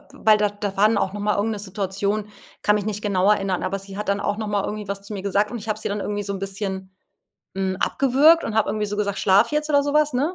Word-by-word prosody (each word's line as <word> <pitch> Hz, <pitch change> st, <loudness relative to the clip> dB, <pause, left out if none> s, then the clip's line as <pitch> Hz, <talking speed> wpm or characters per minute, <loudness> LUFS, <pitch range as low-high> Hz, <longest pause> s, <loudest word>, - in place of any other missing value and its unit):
weil 220 Hz, -6 st, +4 dB
da 210 Hz, -1 st, +2 dB
da 205 Hz, -1 st, -5 dB
waren 210 Hz, +1 st, +4 dB
auch 195 Hz, 0 st, -1 dB
noch 205 Hz, -, -5 dB
mal 210 Hz, 0 st, +1 dB
irgend 210 Hz, +2 st, 0 dB
'ne 210 Hz, -, -4 dB
Situation 200 Hz, +1 st, -2 dB, 0.3 s
kann 210 Hz, -, +4 dB
mich 210 Hz, -1 st, -1 dB
nicht 210 Hz, -1 st, -3 dB
genau 200 Hz, -1 st, +2 dB
erinnern, 195 Hz, -3 st, +1 dB
aber 195 Hz, +1 st, -2 dB
sie 195 Hz, 0 st, -9 dB
hat 210 Hz, -, -5 dB
dann 200 Hz, 0 st, 0 dB
auch 205 Hz, -, -1 dB
noch 215 Hz, -1 st, -4 dB
mal 205 Hz, -1 st, 0 dB
irgendwie 210 Hz, 0 st, -4 dB
was 200 Hz, 0 st, -4 dB
zu 205 Hz, +1 st, -7 dB
mir 195 Hz, -, -5 dB
gesagt 200 Hz, +1 st, +1 dB
und 240 Hz, -, -5 dB
ich 220 Hz, +1 st, -9 dB
habe 215 Hz, -, -1 dB
sie -, -, -3 dB
dann 205 Hz, +1 st, -3 dB
irgendwie 205 Hz, +1 st, -3 dB
so 200 Hz, -, -3 dB
'n -, -, -4 dB
bisschen, 190 Hz, -1 st, -4 dB, 0.6 s
hm, 190 Hz, -1 st, -1 dB
abgewürgt 285 Hz, +5 st, +4 dB
und 220 Hz, -, -3 dB
habe 220 Hz, -2 st, +2 dB
irgendwie 210 Hz, +1 st, -1 dB
so 205 Hz, 0 st, -4 dB
gesagt: 200 Hz, -2 st, -1 dB
„Schlaf 200 Hz, +8 st, +4 dB
jetzt!" 300 Hz, 0 st, 0 dB
oder 285 Hz, -1 st, +4 dB
so 285 Hz, +1 st, -2 dB
was, 300 Hz, -1 st, +3 dB
ne? 290 Hz, +9 st, 0 dB
205 Hz, 285 wpm, -23 LUFS, 195-215 Hz, 0.6 s, weil